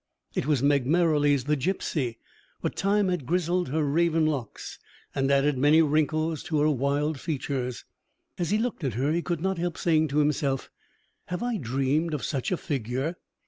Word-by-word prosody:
It - - -2
was 145 -4 +2
Meg 140 -3 +3
Merrilies 145 -4 +3
the 150 +3 +1
gipsy; 140 -5 -2 0.4
but - - -3
time 200 0 +2
had 175 -8 -2
grizzled 180 -1 0
her 155 +3 0
raven 165 +2 +2
locks, 140 -8 -4 0.3
and 135 0 0
added 140 -1 +2
many 150 +4 +5
wrinkles 155 +1 +1
to 155 -3 0
her 155 +1 +4
wild 145 +2 0
features. 130 -5 -3 0.5
As 175 - -1
he 210 - +2
looked 225 -6 -2
at 130 -7 -1
her, 135 +5 +1
he 170 +2 +1
could 170 -3 -3
not 190 -1 -1
help 175 -1 -2
saying 160 -2 +2
to 145 0 -2
himself: 145 -2 0 0.6
"Have 180 +4 -3
I 240 -2 -1
dreamed 140 - 0
of 145 - -5
such 135 +2 -2
a 180 - +1
figure?" 135 +5 -3
150 Hz, 180 wpm, -27 LUFS, 140-170 Hz, 0.6 s, many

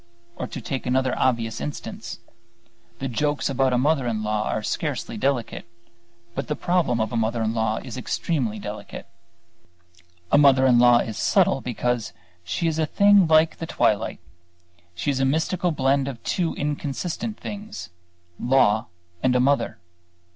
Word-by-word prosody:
Or - - -4
to - - -7
take 130 +2 -4
another 130 0 +1
obvious 115 -3 0
instance: 115 -5 -6 0.8
the 135 - -3
jokes 145 +3 -1
about 135 0 +2
a 125 - +2
mother 140 0 +2
in 110 -2 -1
law 105 0 -1
are 110 - -2
scarcely - - -3
delicate, 135 -4 -1 0.7
but 135 - -4
the 150 - -1
problem 170 -10 +1
of 110 +1 -1
a - - -1
mother 115 0 0
in 110 0 0
law 110 -1 0
is 130 -1 -7
extremely 125 -3 -1
delicate. 105 0 -7 1.3
A 145 - +6
mother 135 -2 +6
in 125 -2 +5
law 120 0 +7
is 110 -3 -2
subtle - - +3
because 120 -2 -2 0.3
she 85 - -2
is 160 -1 -1
a 155 - +1
thing 200 +1 +5
like 160 0 +4
the 165 - -5
twilight. 110 -7 +1 0.8
She 145 - -1
is 135 - -2
a - - +2
mystical 160 +6 +1
blend 135 -1 +1
of 130 -4 -7
two 175 -3 -1
inconsistent 150 +9 -3
things 210 +1 -7 0.5
law 120 -3 +3 0.3
and 125 -1 +2
a - - +4
mother. 140 +3 +1
130 Hz, 160 wpm, -24 LUFS, 115-150 Hz, 1.3 s, law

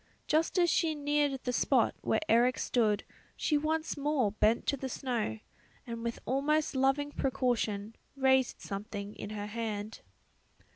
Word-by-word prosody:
Just 320 +4 +1
as 350 -1 +5
she 320 -2 +2
neared 290 -2 +1
the 250 - -1
spot - - +3
where - - +1
Eric 240 +2 +4
stood 215 -4 +1 0.3
she 305 - 0
once 315 +2 0
more 285 -7 +1
bent 215 +2 +2
to - - +1
the 265 -1 -5
snow, 240 - -2 0.5
and 230 -1 -5
with 235 0 -2
almost 290 +4 +1
loving 270 +2 +2
precaution 240 -6 -1 0.2
raised 265 -2 +3
something 205 0 -5
in - - -7
her 210 -1 -4
hand. 215 -1 -4
255 Hz, 145 wpm, -31 LUFS, 220-290 Hz, 0.5 s, as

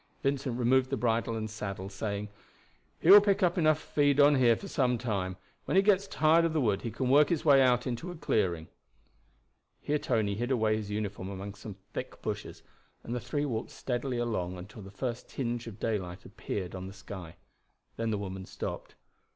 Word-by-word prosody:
Vincent 135 -3 -1
removed 130 +2 +3
the 135 - -1
bridle 115 -1 0
and 110 -1 -3
saddle, 100 -3 -5
saying: 100 +1 -4 0.7
"He 175 - +5
will 205 +1 +11
pick 200 -1 +2
up 175 -1 +3
enough 155 -3 +3
to - - -14
feed 145 -1 +3
on 145 +1 +7
here 125 -4 +5
for 200 - -8
some 125 -8 +1
time. 100 -6 -2 0.3
When - - +1
he 195 - +6
gets 200 -1 +3
tired 160 -1 +4
of 165 -1 +1
the 160 - +1
wood 105 -7 +1
he 115 - -3
can 130 +3 -2
work 145 +3 +5
his 165 -3 -1
way 140 -3 +7
out 125 -1 +3
into 125 +8 -3
a 175 - -6
clearing." 90 - 0 1.1
Here 150 +1 -1
Tony 105 -6 0
hid 120 +5 -2
away 110 -4 +2
his 105 -1 -4
uniform 105 -2 -3
among 100 +1 -6
some 105 -1 -9 0.2
thick - - -6
bushes, - - -5 0.4
and 115 - -5
the 125 - -1
three 145 +4 -2
walked 115 -5 -3
steadily 125 0 -3
along 95 -7 -2
until 105 +5 -10
the 95 - -10
first 115 +5 -5
tinge 120 -2 -3
of 105 -2 -9
daylight 95 -4 -3
appeared 100 -3 -5
on 95 0 -6
the 95 - -9
sky. 95 -4 -9 0.6
Then 115 0 -1
the 105 - 0
woman 95 -1 -5
stopped. - - -6
115 Hz, 200 wpm, -30 LUFS, 100-140 Hz, 1.1 s, will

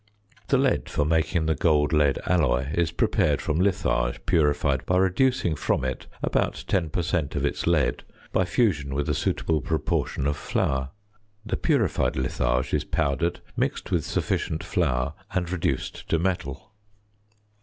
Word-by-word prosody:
The - - +3
lead - - +1
for 75 - 0
making 80 +1 +1
the 80 - +2
gold 75 0 +2
lead 75 -3 +3
alloy 70 -6 +1
is 85 -1 +1
prepared 85 - +1
from 75 +2 -1
litharge 85 -10 0
purified 75 -4 +2
by 90 - +2
reducing 95 -1 +2
from 65 - 0
it 65 -1 -4 0.2
about - - 0
10 90 -5 +1
per 85 +3 -1
cent. 80 -3 -1
of 70 -1 0
its 70 - -2
lead 75 -8 +2 0.3
by 95 - +3
fusion 80 - +1
with 70 0 -1
a - - +2
suitable 80 -2 0
proportion 65 - -1
of 75 +1 0
flour; 65 -2 -1 0.6
the 110 - -1
purified 130 - +1
litharge 65 -1 0
is - - +2
powdered, 80 +2 -1
mixed - - -2
with - - +1
sufficient 80 - -1
flour 65 +3 0 0.2
and 90 -1 -1
reduced 90 -3 -2
to 80 - +3
metal. 85 -5 -3
80 Hz, 155 wpm, -25 LUFS, 70-85 Hz, 0.6 s, The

